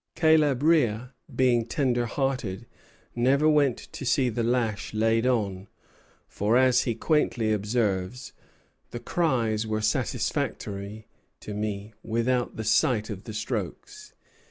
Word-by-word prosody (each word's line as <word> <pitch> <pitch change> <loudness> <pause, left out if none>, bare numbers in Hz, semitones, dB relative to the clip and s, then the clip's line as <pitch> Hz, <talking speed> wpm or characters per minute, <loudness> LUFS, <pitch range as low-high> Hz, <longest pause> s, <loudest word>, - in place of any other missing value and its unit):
Caleb 155 -5 +3
Rea, 125 -8 +2 0.3
being 120 -2 +2
tender 120 -2 0
hearted, 130 -7 -2 0.5
never 135 +5 +3
went 145 -5 +3
to - - -9
see 130 0 +2
the 120 +1 -2
lash 115 -3 -1
laid 115 +2 +2
on; 100 -6 -1 0.6
for, 105 +4 +1
as 130 -1 +4
he 115 - -1
quaintly 115 -5 +1
observes, 105 +2 -1 0.6
"the 120 - -6
cries 115 -7 0
were 110 0 -1
satisfactory 105 -1 -2 0.4
to 105 - -7
me, 105 0 -4
without 120 +2 -1
the 110 - -4
sight 110 0 +2
of 100 -1 -8
the 110 - -7
strokes." 420 - -5
115 Hz, 125 wpm, -26 LUFS, 110-130 Hz, 0.6 s, as